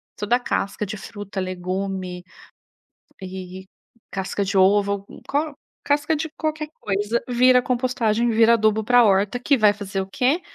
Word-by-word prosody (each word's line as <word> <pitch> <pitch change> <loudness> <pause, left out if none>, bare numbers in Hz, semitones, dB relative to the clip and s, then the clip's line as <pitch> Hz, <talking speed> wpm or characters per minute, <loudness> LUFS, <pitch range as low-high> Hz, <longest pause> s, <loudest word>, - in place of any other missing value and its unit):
Toda 220 +4 +1
casca 210 -4 -2
de 210 +2 -6
fruta, 205 -1 -7
legume 185 0 -4 1.0
e 185 0 -8 0.4
casca 195 +1 -2
de 195 +1 -2
ovo, 200 +1 +3 0.2
co 295 +1 -1 0.3
casca 290 +2 +1
de 320 +1 -4
qualquer 310 -1 -2
coisa, 205 +4 -1
vira 250 +1 +5
compostagem, 240 -2 0
vira 225 +1 +5
adubo 220 -1 +2
pra 245 +1 +5
horta, 200 +3 +2
que 275 +2 +2
vai 210 -2 +5
fazer 195 -1 -4
o 190 - -3
quê? 255 - +1
210 Hz, 140 wpm, -22 LUFS, 195-245 Hz, 1.0 s, vira